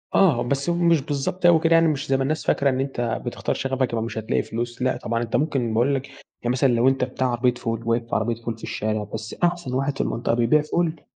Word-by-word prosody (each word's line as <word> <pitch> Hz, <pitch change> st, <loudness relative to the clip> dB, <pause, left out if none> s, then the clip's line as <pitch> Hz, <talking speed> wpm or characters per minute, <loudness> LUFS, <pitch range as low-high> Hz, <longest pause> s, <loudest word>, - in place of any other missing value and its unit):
آه 155 Hz, -11 st, +4 dB
بس 140 Hz, +6 st, -1 dB
هو 170 Hz, -, +1 dB
مش 170 Hz, -3 st, +3 dB
بالضبط 145 Hz, +6 st, -3 dB
أوي 170 Hz, -2 st, +7 dB
كده 165 Hz, 0 st, +3 dB
يعني 165 Hz, 0 st, +5 dB
مش 150 Hz, -3 st, -1 dB
زي 135 Hz, -, +3 dB
ما 135 Hz, -, 0 dB
الناس 155 Hz, +3 st, -2 dB
فاكرة، 140 Hz, 0 st, +3 dB
إن 130 Hz, 0 st, -1 dB
أنتَ 135 Hz, -2 st, -2 dB, 0.2 s
بتختار -, -, -2 dB
شغفك 130 Hz, -2 st, -1 dB
يبقي 115 Hz, -1 st, 0 dB
مش 115 Hz, -, -5 dB
هتلاقي 110 Hz, -, 0 dB
فلوس 120 Hz, +2 st, -5 dB
لأ 130 Hz, 0 st, +1 dB
طبعًا 115 Hz, +1 st, -2 dB
أنت 115 Hz, -, -3 dB
ممكن 135 Hz, -7 st, 0 dB
باقول 130 Hz, +5 st, +2 dB
لَك 135 Hz, +1 st, -4 dB
يعني 120 Hz, -, -7 dB
مثلًا 130 Hz, +1 st, +2 dB
لو 120 Hz, +2 st, +3 dB
أنتَ 135 Hz, -1 st, +2 dB
بتاع 130 Hz, 0 st, -1 dB
عربية 125 Hz, 0 st, +1 dB
فول، 115 Hz, -1 st, -4 dB
واقف 115 Hz, 0 st, 0 dB
في -, -, -1 dB
عربية 115 Hz, +1 st, 0 dB
فول 115 Hz, -1 st, -4 dB
في -, -, -18 dB
الشارع 110 Hz, 0 st, -2 dB
بس 110 Hz, 0 st, -5 dB
أحسن 175 Hz, -6 st, 0 dB
واحد 135 Hz, +1 st, 0 dB
في -, -, 0 dB
المنطقة 115 Hz, 0 st, -1 dB
بيبيع 120 Hz, +6 st, +3 dB
فول، 160 Hz, 0 st, -1 dB
130 Hz, 255 wpm, -23 LUFS, 115-145 Hz, 0.2 s, أوي